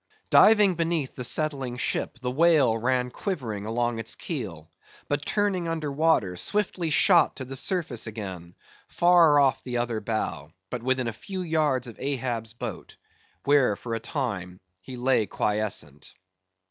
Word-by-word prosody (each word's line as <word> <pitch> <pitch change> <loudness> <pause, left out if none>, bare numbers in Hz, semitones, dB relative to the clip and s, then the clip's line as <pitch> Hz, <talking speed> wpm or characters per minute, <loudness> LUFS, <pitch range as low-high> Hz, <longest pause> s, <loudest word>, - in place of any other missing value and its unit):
Diving 210 -3 +6
beneath 165 -4 -1
the 125 - -6
settling 135 -2 0
ship, 125 - -2
the 125 0 -3
whale 150 -5 +4
ran 125 +2 0
quivering 120 - -4
along 120 0 -1
its 115 0 -4
keel; 95 - -6 0.4
but 145 0 -1
turning 200 -5 0
under 160 -3 -2
water, 140 - +2
swiftly 185 - -1
shot 170 +3 +4
to 130 - -6
the 135 +1 -6
surface 145 - -1
again, 95 -6 -7 0.3
far 175 -4 +5
off 135 -3 +2
the 125 -1 -3
other 120 -2 -1
bow, 100 -9 -3 0.2
but 125 - -4
within 130 0 0
a 115 - -3
few 185 - -6
yards 155 -6 +1
of 115 - -10
Ahab's 125 -5 -2
boat, 120 - -7 0.5
where, 140 -7 +3
for 115 +3 -6
a 115 - -1
time, 100 - -4 0.2
he 125 +7 -9
lay 125 -3 +2
quiescent. 100 -10 -3
130 Hz, 150 wpm, -26 LUFS, 115-160 Hz, 0.5 s, Diving